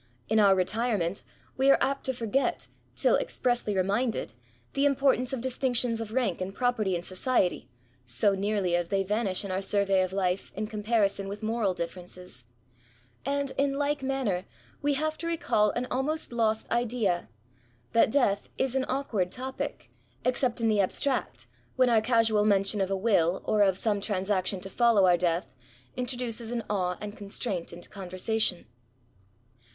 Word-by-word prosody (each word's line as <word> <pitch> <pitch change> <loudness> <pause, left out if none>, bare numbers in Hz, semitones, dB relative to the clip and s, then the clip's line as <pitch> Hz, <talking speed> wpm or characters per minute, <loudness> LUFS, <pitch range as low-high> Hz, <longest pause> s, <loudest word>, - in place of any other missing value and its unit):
In 220 +1 +3
our 200 -2 +6
retirement^ 195 -1 0 0.4
we 265 +1 +3
are 275 - +7
apt 275 +1 0
to - - +2
forget^ 245 +2 -1 0.3
till - - +3
expressly 240 -4 0
re 185 - +3
minded, 215 - -1 0.4
the 275 +1 +2
importance 275 -2 +2
of 265 -3 -3
distinctions 245 -2 0
of 220 -1 -6
rank 225 -8 0
and 190 +2 -4
property 235 -7 +1
in 175 - -3
society, 185 +1 0 0.3
so 125 - +2
nearly 195 -2 0
as 175 -1 0
they 195 +1 +1
vanish 205 -1 0
in 195 - -4
our 185 +1 -1
survey 195 -1 +2
of 185 0 -1
life, 190 -1 -1
in 215 +3 -2
comparison 210 -2 0
with 205 +2 -7
moral 220 -4 0
differences; 175 -5 -7 0.8
and, 280 -1 -1
in 280 0 +2
like 290 0 0
manner, 260 -9 -1 0.4
we 285 0 +1
have 310 +2 -2
to 335 - -4
recal 260 -10 +2
an 240 +4 -2
almost 300 +4 -1
lost 220 -2 +1
idea, 230 - 0 0.6
that 230 - +5
death 220 -6 +1
is 265 -1 0
an 265 -1 +1
awkward 230 -9 -1
topic, 260 +1 -5 0.3
except 250 -1 +1
in 230 - +1
the 210 -2 +3
abstract, 260 +8 -1 0.3
when 255 -2 +4
our 225 -2 +5
casual 225 -2 +3
mention 200 0 +3
of 190 - 0
a 195 - 0
will, 190 -4 +2
or 215 - +2
of 190 -2 +4
some 205 -2 0
transaction 195 -1 -1
to 195 - -4
follow 230 -4 +4
our 180 -1 +5
death, 175 0 -1 0.4
introduces 245 -2 -2
an 235 -1 -2
awe 180 -3 0
and 210 0 -7
constraint 200 -2 -3
into 175 +1 -10
conversation. 190 0 -1
215 Hz, 165 wpm, -28 LUFS, 190-250 Hz, 0.8 s, are